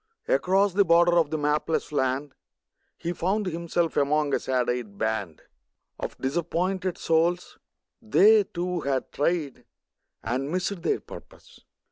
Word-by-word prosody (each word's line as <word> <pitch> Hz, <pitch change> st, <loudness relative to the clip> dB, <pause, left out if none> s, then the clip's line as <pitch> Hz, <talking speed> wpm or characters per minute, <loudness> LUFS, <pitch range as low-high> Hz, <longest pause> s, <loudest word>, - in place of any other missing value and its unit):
Across 195 Hz, -, +2 dB
the 200 Hz, +2 st, +4 dB
border 170 Hz, 0 st, +4 dB
of 165 Hz, -4 st, +3 dB
the 155 Hz, -, -2 dB
mapless 150 Hz, +2 st, -1 dB
land 135 Hz, 0 st, -1 dB, 0.6 s
He 170 Hz, -, -3 dB
found 195 Hz, +5 st, -1 dB
himself 170 Hz, -1 st, -1 dB
among 145 Hz, 0 st, +1 dB
a -, -, +2 dB
sad 130 Hz, -2 st, -1 dB
eyed 120 Hz, -5 st, -3 dB
band 105 Hz, -8 st, -3 dB, 0.6 s
Of -, -, -5 dB
disappointed 175 Hz, +6 st, -2 dB
souls; 170 Hz, +2 st, 0 dB, 0.4 s
they, 215 Hz, -1 st, +5 dB
too, 180 Hz, -1 st, -3 dB
had 135 Hz, -3 st, -2 dB
tried 150 Hz, -2 st, -1 dB, 0.6 s
And 135 Hz, +3 st, -2 dB
missed 185 Hz, +2 st, -2 dB
their 415 Hz, -, 0 dB
purpose. -, -, -14 dB
165 Hz, 130 wpm, -26 LUFS, 140-180 Hz, 0.6 s, they